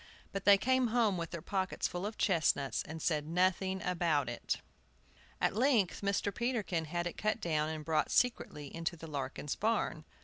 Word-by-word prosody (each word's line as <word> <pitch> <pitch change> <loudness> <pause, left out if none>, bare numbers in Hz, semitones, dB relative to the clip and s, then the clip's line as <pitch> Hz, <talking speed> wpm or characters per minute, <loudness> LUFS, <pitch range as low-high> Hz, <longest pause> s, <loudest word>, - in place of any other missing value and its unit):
But 195 -1 -4
they 200 -1 +8
came 260 +4 +2
home 225 -3 +2
with 170 -2 -3
their 170 -3 -6
pockets 190 -2 -1
full 180 +3 -3
of 215 - -7
chestnuts, 155 -6 +2
and 160 +1 -7
said 150 -2 0
nothing 185 +2 +1
about 170 -6 +1
it. - - -2 0.8
At - - +1
length 235 -6 +2
Mr. 200 0 0
Peterkin 210 -9 -1
had 175 +3 -2
it 175 - -4
cut 215 +1 0
down 155 -5 0
and 155 -1 -5
brought 160 -1 +1
secretly 150 - 0
into 165 +1 -2
the 165 - -9
Larkin's 140 -1 -4
barn. 210 -8 0
175 Hz, 175 wpm, -33 LUFS, 160-205 Hz, 0.8 s, they